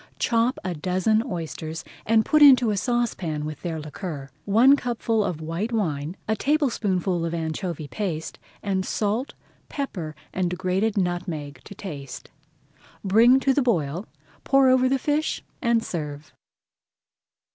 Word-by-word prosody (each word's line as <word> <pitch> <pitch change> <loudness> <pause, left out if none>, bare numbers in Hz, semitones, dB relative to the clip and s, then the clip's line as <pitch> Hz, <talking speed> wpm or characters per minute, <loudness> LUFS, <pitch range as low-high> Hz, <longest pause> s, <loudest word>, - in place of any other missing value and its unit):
Chop 235 +2 +1
a 185 -2 -2
dozen 185 +7 +1
oysters, 165 - -5 0.2
and 220 0 +4
put 305 - +3
into 255 -6 +8
a - - 0
saucepan 195 - -1
with 155 -1 -6
their 165 -3 -3
liquor, 150 -2 -7
one 235 +7 +6
cupful 230 -4 0
of 180 -5 -3
white 165 +8 -3
wine, 165 -6 -2
a 220 - +1
tablespoonful 205 - 0
of 165 0 -2
anchovy 160 -1 -3
paste, 165 -4 -4 0.2
and 190 -2 0
salt, 215 +7 -1 0.3
pepper, 175 - -4 0.2
and 180 -1 -1
grated 190 +4 0
nutmeg 175 -7 -2
to 200 - -10
season. 145 -9 -7 0.8
Bring 230 +6 +6
to 270 - +3
the 285 - +2
boil, 175 - 0 0.4
pour 270 -1 +4
over 255 0 +4
the 270 - +2
fish, 295 +3 -1 0.2
and 235 -2 +2
serve. 150 -5 -6
190 Hz, 135 wpm, -24 LUFS, 160-235 Hz, 0.8 s, into